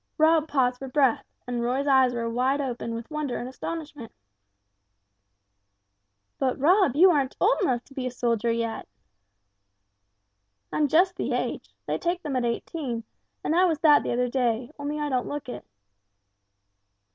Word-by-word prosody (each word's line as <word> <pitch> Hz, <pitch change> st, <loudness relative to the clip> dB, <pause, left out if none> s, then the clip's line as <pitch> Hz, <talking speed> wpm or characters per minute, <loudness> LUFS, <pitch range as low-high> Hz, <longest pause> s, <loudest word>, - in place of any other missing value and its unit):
Rob 315 Hz, 0 st, +4 dB
paused 250 Hz, -4 st, +1 dB
for 270 Hz, -, -6 dB
breath, 265 Hz, -3 st, +2 dB, 0.2 s
and 245 Hz, -1 st, -3 dB
Roy's 255 Hz, +4 st, 0 dB
eyes 265 Hz, -3 st, +4 dB
were 235 Hz, -1 st, -3 dB
wide 255 Hz, +4 st, 0 dB
open 240 Hz, -4 st, -3 dB
with 230 Hz, +5 st, -8 dB
wonder 300 Hz, -4 st, -2 dB
and 245 Hz, -, -5 dB
astonishment. 295 Hz, -2 st, -7 dB, 2.3 s
"But, 260 Hz, -2 st, 0 dB
Rob, 350 Hz, -, +3 dB
you 365 Hz, +5 st, +7 dB
aren't 280 Hz, -4 st, 0 dB
old 440 Hz, +6 st, +3 dB
enough 250 Hz, -10 st, 0 dB
to 275 Hz, -, -18 dB
be 260 Hz, -2 st, -3 dB
a -, -, -1 dB
soldier 235 Hz, -2 st, 0 dB
yet!" 230 Hz, -1 st, -3 dB, 1.9 s
"I'm 300 Hz, -, +2 dB
just 360 Hz, +6 st, +3 dB
the -, -, -2 dB
age -, -, -3 dB
they -, -, -2 dB
take 350 Hz, +1 st, -2 dB
them 290 Hz, -4 st, -3 dB
at 250 Hz, -1 st, 0 dB
eighteen, 240 Hz, 0 st, -3 dB, 0.4 s
and 315 Hz, -, 0 dB
I 365 Hz, +2 st, +5 dB
was 330 Hz, -4 st, +1 dB
that 295 Hz, -2 st, +6 dB
the -, -, -3 dB
other 250 Hz, +1 st, +1 dB
day, 240 Hz, 0 st, -1 dB
only 290 Hz, +1 st, -3 dB
I 295 Hz, -, -1 dB
don't 255 Hz, -3 st, -1 dB
look 290 Hz, -2 st, -5 dB
it." 245 Hz, -, -7 dB
265 Hz, 160 wpm, -26 LUFS, 245-305 Hz, 2.3 s, you